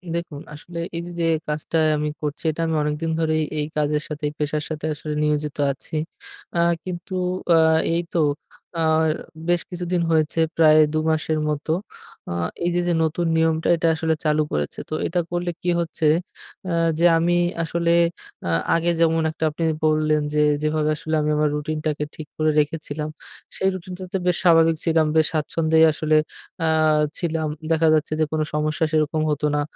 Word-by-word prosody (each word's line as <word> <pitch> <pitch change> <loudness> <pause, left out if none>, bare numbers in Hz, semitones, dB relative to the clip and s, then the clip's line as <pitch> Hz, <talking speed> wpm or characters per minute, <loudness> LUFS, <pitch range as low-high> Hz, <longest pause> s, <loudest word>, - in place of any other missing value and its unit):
দেখুন, 160 -4 -5
আসলে 170 +3 -8 0.2
এই 170 - -2
যে - - -7
যে - - +2 0.2
কাজটা 150 +2 -2 0.2
আমি 150 0 -1
করছি 150 +1 -4
এটা 165 - -5
আমি 160 - 0
অনেকদিন 150 +2 -2
ধরেই 155 -1 +1 0.2
এই 150 - 0
কাজের 150 0 +1
সাথে, 150 0 -7
এই - - -11
পেশার 150 0 -1
সাথে 155 -1 -4
আসলে 150 +1 -5
নিয়োজিত 150 -1 -1
আছি। 140 +3 -8 0.6
আ - - +2 0.2
কিন্তু 185 +1 -6 0.4
আ - - +6 0.4
এই 170 - +1
তো 170 - +1 0.6
আ - - +1 0.7
বেশ 175 -1 +3
কিছুদিন 175 -1 -2
হয়েছে 160 0 +1 0.2
প্রায় 155 -1 +6 0.2
২ - - +1
মাসের 155 0 0
মত। 150 0 -3 0.6
আ - - -2 0.3
এই - - +2
যে 175 - +2
যে 175 - +2
নতুন 165 +2 0
নিয়মটা 160 0 +1
এটা 165 0 0
আসলে 160 0 0
চালু 155 0 +3
করেছে। 75 -1 -2
তো - - -5
এটা 175 - -1
করলে 175 0 -1
কি 180 - -1
হচ্ছে? 160 -1 -2 0.6
আ - - -1 0.3
যে 175 - +4
আমি 175 +1 +2 0.3
আসলে 170 +1 0 0.6
আ - - -1 0.3
আগে 170 +1 +1
যেমন 165 0 +3
একটা 160 - -6
আপনি 160 +2 -5 0.2
বললেন 155 -1 +2
যে, 150 - +1 0.2
যেভাবে 155 0 +1
আসলে 160 0 -3
আমি 150 - 0
আমার 150 0 +2
রুটিনটাকে 155 0 -2
ঠিক 155 -2 -8
করে 155 0 +2
রেখেছিলাম 150 0 -2 0.5
সেই 190 - +2
রুটিনটাতে 185 +1 -6
বেশ 180 -1 +2
স্বাভাবিক 165 -2 +5
ছিলাম। 160 -1 +3
বেশ 160 -1 +4
স্বাচ্ছন্দ্যেই 160 +1 +3
আসলে 155 0 0 0.5
আ - - +2 0.5
ছিলাম। 160 -2 -1 0.2
দেখা 160 0 +3
যাচ্ছে 155 0 +1
যে 155 - +3
কোন 155 -1 0
সমস্যা 155 +2 0
সেরকম 155 0 +1
হতো 150 0 0
না। 145 - +1
155 Hz, 175 wpm, -22 LUFS, 150-165 Hz, 0.7 s, আ